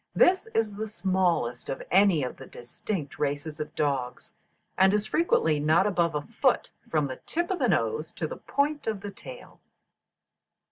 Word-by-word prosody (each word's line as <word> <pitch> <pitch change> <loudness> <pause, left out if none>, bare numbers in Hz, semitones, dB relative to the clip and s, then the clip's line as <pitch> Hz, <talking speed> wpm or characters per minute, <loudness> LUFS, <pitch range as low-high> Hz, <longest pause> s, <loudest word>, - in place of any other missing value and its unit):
This 375 +4 +4
is 220 -2 +1
the 215 +2 -4
smallest 175 - 0
of 135 - -4
any 190 -5 +5
of 125 - -4
the - - -11
distinct 145 - -6
races 145 +1 -2
of 150 - -5
dogs, 135 -4 -2 0.4
and 190 +2 +5
is 210 0 0
frequently 160 - +2
not 155 +5 +3
above 170 -5 +1
a 145 - -1
foot - - 0 0.2
from 155 -2 +1
the 130 -2 -5
tip 345 +3 -1
of 375 - -1
the - - +2
nose 455 - 0
to - - -3
the - - -5
point 290 0 -1
of 215 -3 -2
the 205 0 -6
tail. 130 -9 -12
175 Hz, 175 wpm, -27 LUFS, 145-210 Hz, 0.4 s, any